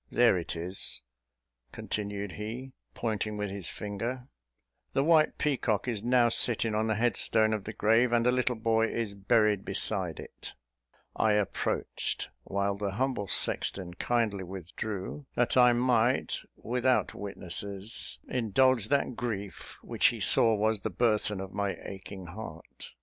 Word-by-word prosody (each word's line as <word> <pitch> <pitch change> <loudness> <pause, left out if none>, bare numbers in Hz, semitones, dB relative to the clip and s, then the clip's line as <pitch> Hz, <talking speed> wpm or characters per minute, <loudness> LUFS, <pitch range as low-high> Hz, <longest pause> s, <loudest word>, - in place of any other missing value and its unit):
There 120 -4 +4
it 85 -1 -3
is," 90 +3 -2 0.7
continued 100 -1 -4
he, 120 +7 -7 0.2
pointing 110 -2 -2
with 105 -1 -3
his 100 -3 -3
finger; 115 +5 -5 0.6
"the 135 - +2
white 160 0 +4
peacock 130 -7 0
is 115 -5 -1
now 120 +1 +3
sitting 115 -1 +2
on 110 +1 0
the 110 - +1
headstone 110 -1 +2
of 105 -3 -3
the 110 - -4
grave, 115 +4 +3
and 120 -1 +2
the 125 - +4
little 125 0 +1
boy 115 0 +1
is 115 -4 -3
buried 105 0 +2
beside 95 -4 +1
it." - - -9 0.6
I 110 -1 +2
approached, 105 -2 -1 0.2
while 100 0 -1
the 100 -1 -3
humble 125 -2 -1
sexton 90 -1 +2
kindly 110 -2 -1
withdrew, 95 - -6
that 120 - +1
I 125 -1 +7
might, 120 0 +2 0.2
without 125 +2 0
witnesses, 100 +2 0
indulge 125 0 +2
that 140 -2 0
grief 100 -8 -5
which - - +2
he - - -1
saw 115 -1 +5
was 110 +1 +1
the 110 - -2
burthen 105 0 0
of 95 0 -7
my 100 -1 -1
aching 95 -1 -8
heart. 85 -2 -10
110 Hz, 145 wpm, -29 LUFS, 100-120 Hz, 0.7 s, I